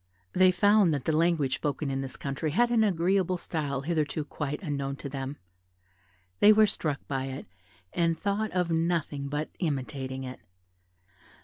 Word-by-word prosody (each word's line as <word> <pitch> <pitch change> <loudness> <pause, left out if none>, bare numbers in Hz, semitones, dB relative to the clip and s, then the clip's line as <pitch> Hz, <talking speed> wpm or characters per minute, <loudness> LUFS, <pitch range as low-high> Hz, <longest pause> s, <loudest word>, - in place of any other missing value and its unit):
They 185 0 +6
found 205 0 +4
that 140 - -5
the - - +2
language 160 -5 +2
spoken 145 -1 -2
in 135 0 -1
this 135 -1 -6
country 140 +3 -3
had 235 +10 +2
an 230 -2 +4
agreeable 185 -1 +2
style 145 -6 -3
hitherto 155 -1 -1
quite 150 -1 -4
unknown 140 -4 -2
to 140 - -7
them; 135 +1 -5 1.0
they 210 - +8
were 215 0 +6
struck 155 -8 -2
by 135 -1 -2
it, 135 +1 -6 0.5
and 165 -1 +1
thought 205 +3 -1
of 180 -2 0
nothing 165 -4 0
but 150 +2 -3
imitating 135 -4 -3
it. 130 0 -7
155 Hz, 155 wpm, -28 LUFS, 140-180 Hz, 1.0 s, they